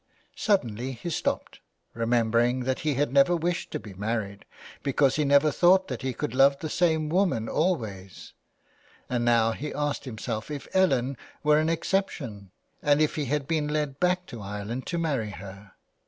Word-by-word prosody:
Suddenly 130 - 0
he 130 +8 -6
stopped, - - -2 0.3
remembering 115 +2 +2
that 130 +1 -1
he 150 -3 0
had 140 0 0
never 140 +5 +5
wished 170 +1 -2
to - - -4
be 105 - -10
married, 100 0 -3 0.4
because 135 -1 +2
he 150 - +1
never 140 +2 +4
thought 185 +4 +4
that 125 -4 -4
he 130 - -1
could 115 - -4
love 135 +1 +5
the 155 +1 -5
same 160 -3 +2
woman 170 - +1
always, 110 - -2 0.8
and 120 -1 0
now 115 -1 +3
he 145 +6 -5
asked 145 -1 -2
himself 115 -1 -5
if 145 -2 -6
Ellen 135 -8 +2 0.3
were 150 0 +5
an 155 +1 +1
exception, 155 - -2 0.3
and 145 0 +3
if 155 -1 +2
he 150 - -2
had 140 +1 -1
been 155 -2 0
led 150 -2 -2
back 180 0 +1
to 120 -9 -9
Ireland 105 +5 -5
to 175 - -2
marry 140 -10 -1
her. 100 0 -10
135 Hz, 170 wpm, -27 LUFS, 115-155 Hz, 0.8 s, never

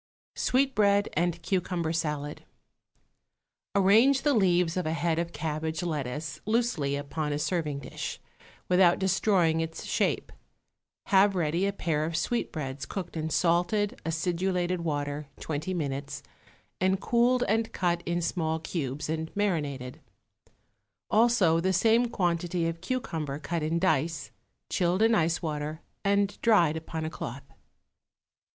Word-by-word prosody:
_ - - -9
=Sweetbread 210 -7 +3
and 175 +1 0
Cucumber 175 -3 -1
Salad.= 150 -2 -3 1.3
Arrange 220 +8 +5
the 290 - +3
leaves 180 -6 +3
of 180 -3 -1
a 160 - 0
head 165 0 0
of 170 0 -2
cabbage 155 +1 -3
lettuce 150 -2 -3
loosely 215 -12 +1
upon 150 +1 -3
a 145 - 0
serving 150 -3 -1
dish, - - -6 0.5
without 180 -1 +5
destroying 190 -3 +2
its 165 0 -5
shape. - - 0 0.7
Have 195 0 +4
ready 170 +2 +1
a - - +1
pair 165 -6 -1
of 160 +1 -2
sweetbreads 155 - -2
cooked 180 -4 -5
in 160 0 -2
salted, 180 +6 +1
acidulated 175 +2 -1
water 145 -2 -2
twenty 155 +4 -3
minutes, 140 -4 -3 0.6
and 190 +1 +2
cooled 245 +3 +2
and 225 +2 +1
cut 175 -2 0
in 175 0 0
small 160 -2 0
cubes 150 -3 -4
and 160 +1 -2
marinated; 145 -11 -2 1.1
also 215 -8 +4
the 190 +2 +1
same 230 +6 +4
quantity 175 -3 0
of 165 0 -4
cucumber 160 - -3
cut 165 +2 -3
in 155 +2 0
dice, 160 -3 0 0.4
chilled 180 +3 +1
in 225 +1 +4
ice 170 -5 +1
water 155 0 -3 0.2
and 200 0 +1
dried 175 -9 +4
upon 160 0 -4
a - - -2
cloth. 135 -2 -6
170 Hz, 130 wpm, -28 LUFS, 155-190 Hz, 1.3 s, Arrange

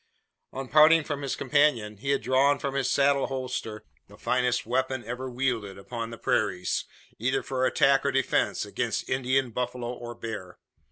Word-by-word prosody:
On 135 0 -6
parting 155 +3 +6
from 145 -1 -4
his 140 - -2
companion, 125 -7 +1
he 140 +8 -5
had 140 - +1
drawn 140 +2 +3
from 140 -1 -3
his 135 -2 0
saddle 140 0 +3
holster 125 -5 -4 0.2
the - - -16
finest 125 -1 0
weapon 130 +1 -1
ever 125 +3 -5
wielded 120 -6 -2
upon 115 +3 -6
the 115 - -8
prairies 100 -5 0 0.3
either 130 +4 0
for 130 -1 0
attack 135 0 +3
or 140 - +1
defence, 135 0 +1
against - - -2
Indian, 130 0 0
buffalo, 125 0 -3
or 120 -1 -8
bear. 110 -6 -7
130 Hz, 165 wpm, -27 LUFS, 115-135 Hz, 0.3 s, parting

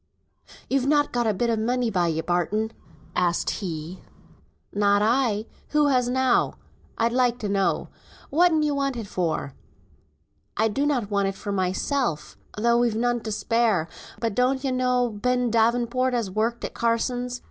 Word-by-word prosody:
"You've 270 -1 +1
not 290 0 +3
got 240 -1 0
a 215 - +2
bit 235 +4 0
o' - - +2
money 240 +2 0
by 180 -3 +1
you, 160 -1 -1
Barton?" 190 +6 0 0.4
asked 175 -1 +1
he. 170 -1 -5 0.7
"Not 205 0 +3
I; 225 -2 +1 0.2
who 300 -1 +3
has 250 -2 +2
now, 260 -1 +2 0.4
I'd 230 +1 +1
like 245 -1 +2
to 215 - -4
know. 195 -1 0 0.4
Whatten 320 0 +4
you 300 -1 +1
want 275 -2 -1
it 225 - -4
for?" 165 -7 -2 1.0
"I 220 +1 +3
donnot 260 -3 0
want 200 -1 +1
it 195 - -3
for 200 +1 -5
mysel, 190 - 0 0.4
tho' 235 +2 +3
we've 240 -2 +1
none 240 +1 +1
to 220 - -5
spare. 220 -6 +1 0.3
But 230 -2 -1
don 250 +4 +2
ye 270 - 0
know 250 -1 +1
Ben 245 +3 0
Davenport 240 +3 +2
as 225 -6 -1
worked 225 +4 -1
at - - -6
Carsons'? 245 +2 -1
235 Hz, 160 wpm, -25 LUFS, 205-250 Hz, 1.0 s, Whatten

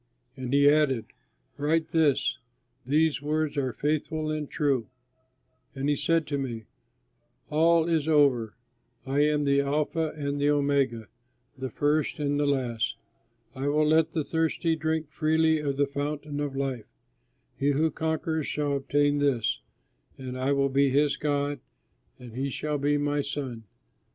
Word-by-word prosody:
And 130 -1 -5
he 140 +1 +5
added, 145 -6 +3 0.5
"Write 160 +2 0
this: 145 -5 +2 0.5
'These 150 +2 +2
words 155 +1 -1
are 135 -3 0
faithful 155 +4 -1
and 155 -2 -3
true.'" 140 -6 0 0.9
And 135 +2 -1
he 145 - +3
said 165 +2 +1
to 145 -1 -2
me, 120 -5 -4 0.9
"All 165 +2 +4
is 160 -3 +1
over! 135 -8 +3 0.5
I 135 +2 0
am 150 0 +3
the 140 0 +3
Alpha 150 +3 -1
and 140 -1 -2
the 145 - +3
Omega, 140 -6 +1 0.5
the 130 0 -5
First 145 +4 0
and 145 -1 0
the 145 - +1
Last. 120 -4 -1 0.6
I 135 +1 -3
will 150 +1 +2
let 160 +1 +3
the 160 - 0
thirsty 160 +1 0
drink 160 -1 -2
freely 160 0 +2
of 140 -2 -2
the 145 - +3
fountain 145 +1 -4
of 145 -2 -3
life. 135 -5 -3 0.7
He 140 - +2
who 155 +3 +2
conquers 160 0 -2
shall 145 -1 -1
obtain 145 +1 +1
this, 135 -6 +1 0.6
and 130 -1 -6
I 130 +2 0
will 140 0 +2
be 140 +1 +3
his 145 +2 +2
God 145 -1 -1 0.6
and 125 -3 -12
he 135 +2 -2
shall 150 +2 -2
be 145 +1 +2
my 145 0 0
son." 130 -5 -5
145 Hz, 150 wpm, -27 LUFS, 135-155 Hz, 0.9 s, he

